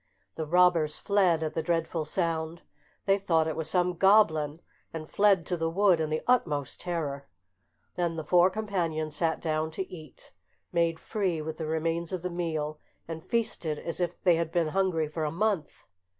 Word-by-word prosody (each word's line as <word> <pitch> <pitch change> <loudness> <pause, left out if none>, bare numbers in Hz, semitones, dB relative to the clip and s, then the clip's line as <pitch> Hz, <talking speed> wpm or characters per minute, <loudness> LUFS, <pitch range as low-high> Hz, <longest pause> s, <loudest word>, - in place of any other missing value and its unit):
The 160 -1 -4
robbers 170 -2 +4
fled 185 -5 +2
at 155 - -2
the 160 - -1
dreadful 165 -1 -1
sound; 165 0 -2 0.4
they 195 0 +3
thought 165 -5 +2
it 160 - -2
was 160 -1 -3
some 180 +1 +2
goblin, 165 -6 +3 0.3
and 155 -1 -6
fled 200 -3 +3
to 180 - -2
the 165 0 0
wood 185 0 +3
in 155 -1 -1
the 155 0 -2
utmost 150 - 0
terror. 155 -6 -3 0.7
Then 170 -2 -1
the 160 - -4
four 175 +4 +5
companions 170 -7 -2
sat 165 0 +1
down 155 0 -1
to 175 +4 -4
table, 155 -7 -11 0.6
made 170 -1 +1
free 190 -6 -1
with 155 0 -5
the 160 - -4
remains 165 +1 -1
of 185 -2 -4
the 180 - -2
meal, 155 -3 -3 0.3
and 160 -1 -6
feasted 180 -9 -1
as 170 - -5
if 175 -1 -2
they 175 -3 +5
had 165 -1 -2
been 170 -2 +1
hungry 180 -3 +1
for 155 +1 -4
a 150 - 0
month. 190 -2 -1
165 Hz, 180 wpm, -28 LUFS, 155-180 Hz, 0.7 s, four